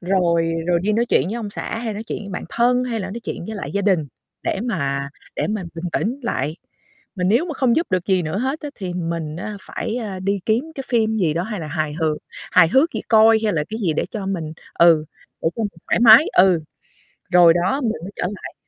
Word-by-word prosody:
rồi 170 -3 +1
rồi 175 -1 +2
đi 215 +2 +1
nói 235 +3 +1
chuyện - - +3
với 220 - -3
ông 220 -3 -5
xã 225 - -4
hay 225 -2 -3
nói 215 - -5
chuyện - - -4
với 200 - -8
bạn 180 - -5
thân 245 +2 +2
hay 230 -3 -2
là 190 0 -5
nói 235 +3 -6
chuyện - - -5
với 220 - -5
lại - - -5
gia 200 0 0
đình 180 -7 +2 0.4
để - - -1
mà 140 - -2 0.3
để - - 0
mình 210 -4 -3
bình 165 +2 -6
tĩnh 250 +6 -1
lại. 155 - -2 0.6
Mà 180 -2 -2
nếu 230 - +3
mà 320 - -4
không 255 -3 +2
giúp 335 - +1
được 185 -1 0
gì 190 -2 +2
nữa 160 +5 -2
hết 265 +5 -2
á 295 - -5
thì 185 -3 -5
mình 165 -3 -3
á 205 +4 -5
phải, 225 - -4
a, 200 -6 -4
đi 200 +1 -1
kiếm 225 +5 +2
cái 270 - -6
phim 220 -2 +1
gì 170 -7 +1
đó, 170 - 0
hay 210 -3 -4
là 155 - -5
hài 155 -1 -2
hước 155 -1 0 0.4
hài 170 -3 +6
hước 275 - +3
gì - - -2
coi 220 0 +6
hay 210 - +2
là 150 -2 0
cái 220 - -4
gì 175 -7 +1
để - - -1
cho 205 -4 -5
mình, 165 -5 -3 0.2
ừ, 165 -2 +5 0.4
để - - +3
cho 225 - -1
mình 200 -5 -6
thoải - - +2
mái, 235 +6 +9
ừ. 180 -3 +5 0.7
Rồi 175 -2 +7
đó 270 +10 0
mình 230 - +1
mới 195 - -7
trở - - -3
lại. 205 0 -7
195 Hz, 250 wpm, -21 LUFS, 170-225 Hz, 0.7 s, mái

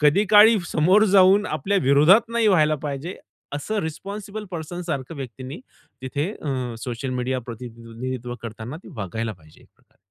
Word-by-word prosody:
कधी 150 +8 +4
काळी 215 +1 +8
समोर 185 +7 +4
जाऊन 195 +2 +6
आपल्या 190 +7 0
विरोधात 150 - +5
नाही 230 -1 +1
व्हायला 155 -5 +4
पाहिजे 145 +5 -4 0.4
असं 210 +9 -3
रिस्पॉन्सिबल 200 +6 -6
पर्सन 175 0 -5
सारख्या 140 0 -4
व्यक्तींनी 130 - -7 0.4
तिथे 145 +7 -2
अ, 130 -5 -3
सोशल 125 +1 -4
मीडिया 125 +1 -2
प्रतिनिधित्व 120 +1 -6
करताना 115 +4 -7
ते - - -11
वागायला 110 +2 -3
पाहिजे, 80 -5 -19
खरं - - -31
तर. - - -35
145 Hz, 150 wpm, -23 LUFS, 125-190 Hz, 0.4 s, काळी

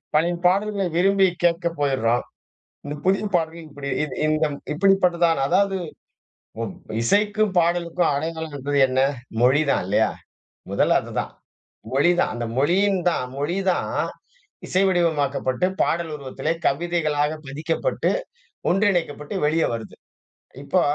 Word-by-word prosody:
பழைய 165 +3 +3
பாடல்களை 200 +2 +2
விரும்பி 195 +2 +4 0.2
கேட்க 170 0 +2
போயுறோம். 125 -4 +1 0.6
இந்த 145 +1 -4
புதிய 195 +2 +2
பாடல்கள் 165 -1 -2
இப்படி 140 -1 -8 0.2
இ - - +1 0.2
இந்தம் 155 -1 0 0.2
இப்படிப்பட்டதா 180 -1 +3 0.2
அதாவது, 195 +4 +2 1.3
இசைக்கும் 210 - +2
பாடலுக்கும் 170 0 +1
அடையாளம் 160 +1 -4
என்பது 145 +1 -2
என்ன? 130 0 0 0.4
மொழி 130 +5 +5
தான் - - +1
இல்லையா? 110 +3 +2 0.6
முதல்ல - - +3
அதுதான். - - -4 0.6
மொழிதான் 175 +6 +3
அந்த 120 0 -3
மொழியின் 190 +7 +2
தான், 165 - -1
மொழி 150 +6 -1
தான் - - -2 0.8
இசை 185 - +2
வடிவமாக்கப்பட்டு 150 -5 +1 0.2
,பாடல் 165 -1 -1
உருவத்திலே 140 +3 -3
கவிதைகளாக 155 -1 0
பதிக்கப்பட்டு, 160 - -1 0.6
ஒன்றிணைக்கப்பட்டு 175 -5 0
வெளியே 160 +2 +2
வருது. 115 -1 -8 0.7
இப்போ, 180 +5 +2
165 Hz, 110 wpm, -23 LUFS, 145-180 Hz, 1.3 s, மொழி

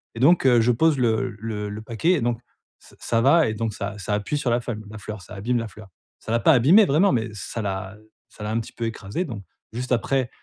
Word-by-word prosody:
et - - -6
donc 150 +3 +4
heu, 120 -2 +6
je 120 +2 +3
pose 155 +4 +3
le 120 0 +1
le 105 -2 -4
le 105 +1 -6
paquet 115 +10 0
et 155 - 0
donc 120 -1 0 0.4
ça - - -19
ça 115 -1 0
va 150 +5 +5
et 110 - -1
donc 110 -1 -2
ça 100 0 -5
ça 105 +2 -3
appuie 105 +8 -1
sur 135 -4 -1
la 120 - +2
feuil 120 -1 -4
la 110 - -9
fleur, 105 0 -7
ça 100 +3 -11
abîme 120 +5 -1
la 115 - -4
fleur. 105 -1 -13 0.3
Ça 110 - -7
l'a 115 - +2
pas 160 - +5
abîmée 165 - +6
vraiment, 170 +7 +3
mais 115 -1 0
ça 110 +3 -5
l'a 95 0 -4
heu, 110 0 -24 0.2
ça 105 - -11
l'a 105 - -3
un 115 - 0
petit 115 - -8
peu 120 - -6
écrasée, 110 - -4
donc 110 - -7 0.3
juste 125 +2 -5
après: 130 +1 0
115 Hz, 265 wpm, -23 LUFS, 105-130 Hz, 0.4 s, heu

